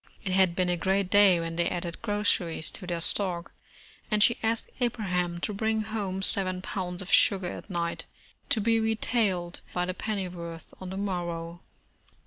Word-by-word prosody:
It 190 - -2
had 185 -2 +4
been 185 0 +1
a 175 - +2
great 190 +1 +1
day 200 -4 +6
when 165 0 -4
they 170 0 +2
added 175 -1 -4
groceries 205 -7 +1
to 185 - -6
their 170 -1 -2
stock, 175 -2 0 0.6
and 210 -1 +4
she 235 - +4
asked 225 0 -1
Abraham 180 -8 -1
to 210 - -1
bring 220 +1 0
home 200 -3 -3
seven 185 -2 +2
pounds 180 -1 -3
of 185 - -8
sugar 190 -3 +5
at - - -9
night, 170 -2 -2 0.4
to 225 - +2
be 225 +2 +3
retailed 220 -5 0
by 180 0 +1
the 185 - -2
pennyworth 180 -5 -5
on 185 - -6
the 190 - -5
mor 185 -3 -1
row. 170 0 -5
185 Hz, 175 wpm, -28 LUFS, 175-205 Hz, 0.6 s, day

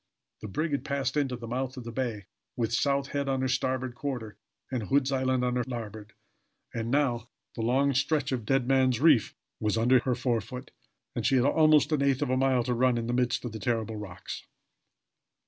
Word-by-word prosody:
The - - -5
brig 155 - -2
had 140 - -1
passed 140 -2 -1
into 140 -4 0
the 120 -1 -8
mouth 130 +2 -3
of 125 - -6
the 115 - -6
bay, 115 -6 -3 0.3
with 115 -2 -1
South 140 +3 +1
Head 140 -1 -2
on 135 -1 0
her 130 - +1
starboard 130 -1 -1
quarter, 120 -6 -5 0.4
and 130 -3 -1
Hood's 135 +4 +1
Island 130 -1 +1
on 125 0 0
her 125 - +1
larboard; 110 -4 -6 0.6
and 115 0 -3
now 120 -4 +1 0.3
the - - -3
long 135 +5 +2
stretch 140 +1 +1
of 125 -3 -1
Dead 135 +2 +1
Man's 130 -3 +3
Reef 145 -8 +4 0.2
was 105 +1 0
under 125 +3 +5
her 125 0 0
forefoot, 125 +1 -3 0.4
and - - -2
she 135 - +3
had 125 0 +4
almost 155 0 +4
an 150 -2 +2
eighth 140 0 +2
of 135 - -1
a - - +3
mile 130 -2 +2
to 125 +1 -1
run 125 0 +2
in 115 - -2
the 120 - -2
midst 125 0 0
of 120 - -4
the 110 - -6
terrible 110 -3 -1
rocks! 95 -3 -8
125 Hz, 210 wpm, -28 LUFS, 115-135 Hz, 0.6 s, under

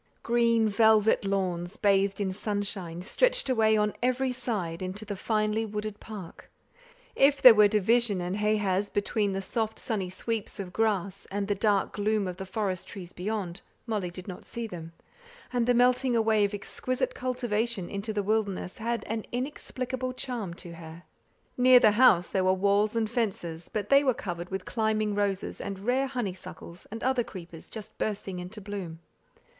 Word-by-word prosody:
Green 230 -1 +3
velvet 220 0 +4
lawns, 185 -1 -1
bathed 200 0 +2
in 195 -2 0
sunshine, 195 -4 -3
stretched - - +1
away 220 -3 +4
on 210 0 +1
every 255 +1 +1
side 200 -10 -3
into 185 +4 -5
the 205 -1 -4
finely 215 +2 0
wooded 210 -1 -4
park; 205 -6 -10 0.7
if 275 +1 +4
there 255 -3 +11
were 210 -1 +6
divisions 215 0 +2
and 180 +2 -2
ha 210 +1 +2
has 200 -1 0
between 205 0 0
the 195 0 -3
soft 220 +1 -2
sunny 205 -7 -2
sweeps 215 +3 -4
of 185 -2 -6
grass, 200 -3 -1
and 200 0 -2
the 205 - +2
dark 205 -1 +1
gloom 210 -1 0
of 180 -1 -5
the 190 -1 -6
forest 190 -2 -2
trees 180 -3 -9
beyond, 190 -2 -3 0.2
Molly 210 -6 -2
did 180 +2 -9
not 185 - -7
see 235 0 -5
them; 165 -6 -8 0.6
and 240 -1 +1
the 245 - +4
melting 250 +1 +3
away 220 -2 +3
of 200 +1 -2
exquisite 255 +5 -2
cultivation 235 -5 -1
into 200 +2 -4
the 210 -1 -1
wilderness 205 -3 -1
had 235 +1 -1
an 220 0 -3
inexplicable 255 -1 -3
charm 240 -9 -4
to 175 -1 -8
her. 165 +1 -10 0.6
Near 250 0 +8
the 215 - +6
house 205 -6 +5
there 190 - 0
were 185 0 +4
walls 200 +3 +2
and 225 -1 +1
fences; 190 -8 -2
but 205 -2 -3
they 275 +1 +6
were 260 -4 +2
covered 175 -2 -5
with 190 -1 -4
climbing 215 -2 0
roses, 200 -1 -1
and 195 - -4
rare 260 +3 +2
honeysuckles 190 -8 -6
and 225 +2 -7
other 255 -1 +2
creepers 170 -6 -10
just 220 -2 -9
bursting 195 -3 -3
into 180 +5 -8
bloom. 195 -5 -6
210 Hz, 170 wpm, -28 LUFS, 190-230 Hz, 0.7 s, there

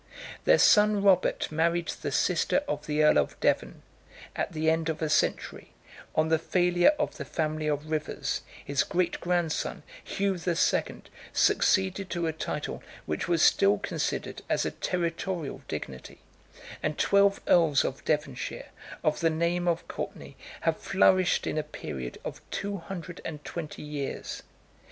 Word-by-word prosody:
Their - - +6
son 210 -1 +5
Robert 190 -5 +3
married 170 +2 +1
the - - -4
sister 285 - +2
of 150 - -3
the 150 0 +2
earl 150 - +6
of - - -2
Devon: - - 0 0.5
at - - -2
the 155 0 -2
end 160 0 +2
of 155 -1 -2
a 155 - -1
century, 150 - 0 0.4
on 155 0 +2
the 160 -1 +3
failure 175 - +3
of - - -2
the - - -4
family 155 -1 -2
of 145 0 -1
Rivers, 155 -1 -2 0.2
84 - - -21
his 140 -1 +1
great 175 -1 0
grandson, 175 -3 -1 0.2
Hugh 195 -2 -1
the 170 0 -1
Second, - - 0 0.2
succeeded 190 0 +2
to 170 -1 -1
a 160 - -1
title 150 -1 -4 0.2
which 75 - -2
was 170 -2 +2
still 200 +1 +5
considered 205 - -3
as - - +1
a - - -1
territorial 170 -2 -3
dignity; 65 -1 -7 0.6
and 155 -1 -2
twelve 200 0 +4
earls 160 -5 +4
of 135 - -4
Devonshire, 150 -5 -2 0.3
of 155 - +1
the 165 - +3
name 170 +2 0
of 170 -1 0
Courtenay, - - -6 0.3
have - - +1
flourished 180 - +3
in 155 - -1
a - - +1
period 65 - -7
of - - -6
two 200 0 -3
hundred 180 -1 -8
and 150 -2 -7
twenty 160 -4 -6
years. 145 -2 -5
165 Hz, 155 wpm, -28 LUFS, 155-180 Hz, 0.6 s, Their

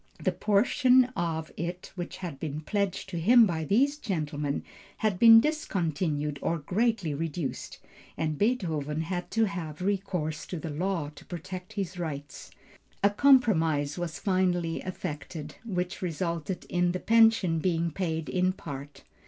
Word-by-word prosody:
The - - +1
portion 250 +5 +4
of 160 -2 -2
it 175 +2 -5
which 175 -2 -6
had 170 -7 -6
been 155 0 -4
pledged 200 +3 -2
to 175 -3 -3
him 230 +7 +7
by 160 -5 -2
these 275 - +2
gentlemen 150 - -2 0.3
had 210 -5 0
been 225 -1 +10
discontinued 165 - -1
or 170 - 0
greatly 195 +1 0
reduced, 155 -1 -4 0.4
and 155 -1 -1
Beethoven 160 - 0
had 175 +1 -3
to 225 +2 +2
have 170 -7 -5
recourse 185 -5 -2
to 180 - -4
the 160 0 -5
law 170 -1 -1
to - - -14
protect 180 +1 -7
his 190 -3 -4
rights. 145 -4 -6 0.5
A 200 - +5
compromise 175 - +3
was 170 -3 -3
finally 180 -4 0
effected, 155 -4 -6
which 180 -4 -3
resulted 170 0 -3
in 175 0 +1
the 185 - -2
pension 225 -7 +4
being 170 -1 0
paid 160 -2 -2
in 185 0 +1
part. 145 -4 -8
175 Hz, 145 wpm, -28 LUFS, 155-200 Hz, 0.5 s, been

